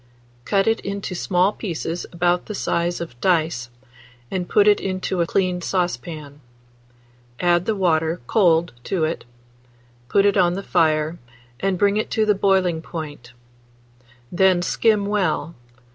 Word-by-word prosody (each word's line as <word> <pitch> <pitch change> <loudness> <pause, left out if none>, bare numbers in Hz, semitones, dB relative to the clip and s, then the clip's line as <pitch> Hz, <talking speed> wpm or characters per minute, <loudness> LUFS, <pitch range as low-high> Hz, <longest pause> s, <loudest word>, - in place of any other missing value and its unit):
Cut 195 -1 +2
it 225 0 +2
into 200 -1 -5
small 180 +2 +1
pieces 170 -3 -4
about 175 +1 0
the 210 - -5
size 175 -2 -1
of 120 -8 -8
dice, 160 -9 +1 0.6
and 180 -2 -3
put 205 0 +4
it 210 - +5
into 185 -1 -2
a 170 - +1
clean 180 -1 0
saucepan. 165 -5 -3 1.0
Add 175 0 +2
the 220 - +1
water 165 -3 +1
cold 170 - +3
to 185 -5 -1
it; 160 -4 -4 0.8
put 200 - +3
it 200 0 +3
on 175 -2 +3
the 195 - -4
fire, 160 -2 +1 0.4
and 195 +4 0
bring 200 +2 +2
it 215 - -1
to 220 - +3
the 210 - +4
boiling 190 -4 +1
point; 145 -8 -8 1.0
then 180 0 +3
skim 210 +2 +2
well. 195 -5 -1
180 Hz, 145 wpm, -22 LUFS, 165-195 Hz, 1.0 s, it